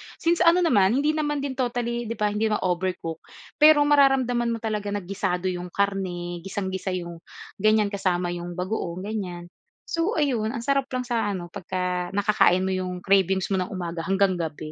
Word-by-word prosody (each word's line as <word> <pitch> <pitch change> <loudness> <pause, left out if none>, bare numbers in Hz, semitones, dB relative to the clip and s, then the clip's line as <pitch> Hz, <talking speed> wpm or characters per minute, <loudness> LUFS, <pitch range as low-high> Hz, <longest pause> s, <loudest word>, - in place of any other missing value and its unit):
since 340 +1 +1
ano 350 +1 +5
naman 210 - +4
hindi 290 +3 +2
naman 295 -2 -1
din 265 -2 -4
totally 240 -1 -1
di 230 - -3
ba, 210 -1 0
hindi 215 +2 0
naman 210 -1 -1
overcook. 180 -3 -2 0.4
Pero 300 -1 +7
mararamdaman 270 -4 +3
mo 230 -1 -3
talaga 210 -2 -2
na 205 - -3
gisado 185 -1 -1
yung 180 0 -5
karne, 180 -2 -2
gisang-gisa 190 0 -3
yung 170 -2 -6 0.4
ganyan, 215 0 +3
kasama 180 -3 0
yung 175 0 -6
bagoong, 185 -1 -3
ganyan. 180 -5 -5 0.3
So, 335 +6 -1
ayun, 250 -8 +1
ang 230 - -4
sarap 275 0 +1
lang 255 - -1
sa 235 -3 -1
ano 175 -2 -7
pagka 180 -2 -3
nakakain 205 -3 +3
mo 190 - -1
yung 185 -1 -3
cravings 190 -1 +2
mo 190 - +2
ng 180 - -1
umaga 170 -2 -5
hanggang 190 -1 +2
gabi. 155 -2 -5
195 Hz, 180 wpm, -25 LUFS, 180-240 Hz, 0.4 s, Pero